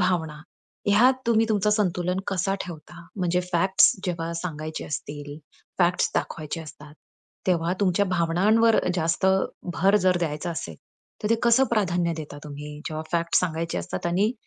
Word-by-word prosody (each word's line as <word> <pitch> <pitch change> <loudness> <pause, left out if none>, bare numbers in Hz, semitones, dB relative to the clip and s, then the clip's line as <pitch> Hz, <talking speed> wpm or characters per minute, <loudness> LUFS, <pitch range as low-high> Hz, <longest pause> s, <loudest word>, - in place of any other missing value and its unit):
भावना 165 -5 0 0.5
ह्यात 235 +6 +5
तुम्ही 225 -1 +3
तुमचं 210 -1 +2
संतुलन 180 -3 0
कसा 195 0 0
ठेवता? 170 0 -11
म्हणजे 180 -2 +1
फॅक्ट्स 190 +3 +5
जेव्हा 170 -2 -2
सांगायचे 155 -2 -5
असतील, 145 0 -6 0.4
फॅक्ट्स 175 0 +2
दाखवायचे 160 +1 -3
असतात, 150 -1 -12 0.5
तेव्हा 170 -1 +1
तुमच्या 195 +1 +3
भावनांवर 190 +6 +3 0.2
जास्त 165 +2 0 0.5
भर 195 +3 +4
जर 185 -1 +4
द्यायचा 160 +1 -2
असेल, 85 - -5 0.5
तर 210 - 0
ते - - +6
कसं 240 +2 +5
प्राधान्य 175 -6 +1
देता 150 -2 -7
तुम्ही, 150 0 -8
जेव्हा 155 0 -4
फॅक्ट्स 170 0 +2
सांगायचे 165 -1 -2
असतात - - -4
आणि 195 +7 +2
175 Hz, 140 wpm, -25 LUFS, 160-195 Hz, 0.5 s, ते